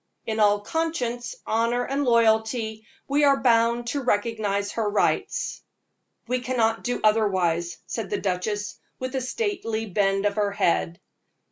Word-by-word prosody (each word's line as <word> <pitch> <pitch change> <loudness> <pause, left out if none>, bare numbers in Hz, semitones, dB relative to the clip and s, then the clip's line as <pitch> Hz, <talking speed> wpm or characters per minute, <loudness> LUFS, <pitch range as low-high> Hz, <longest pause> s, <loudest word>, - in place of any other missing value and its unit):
In 220 -1 -2
all 205 -1 +4
conscience, 260 - -2
honor 230 +2 +1
and 275 +2 -1
loyalty, 220 -2 +2 0.2
we 285 +2 +2
are 280 -1 +5
bound 235 -1 +3
to 285 +4 -1
recognize 205 -3 0
her 220 -2 -1
rights." 205 - 0 0.7
"We 250 0 0
cannot 235 -3 0
do 245 0 -2
otherwise," 185 -6 +2
said - - -4
the 410 - -1
duchess, 205 +3 -2 0.2
with 255 0 -5
a 265 - -1
stately 255 - -2
bend 195 0 +1
of 205 +1 0
her 205 -1 +1
head. 85 - +1
225 Hz, 140 wpm, -25 LUFS, 205-250 Hz, 0.7 s, are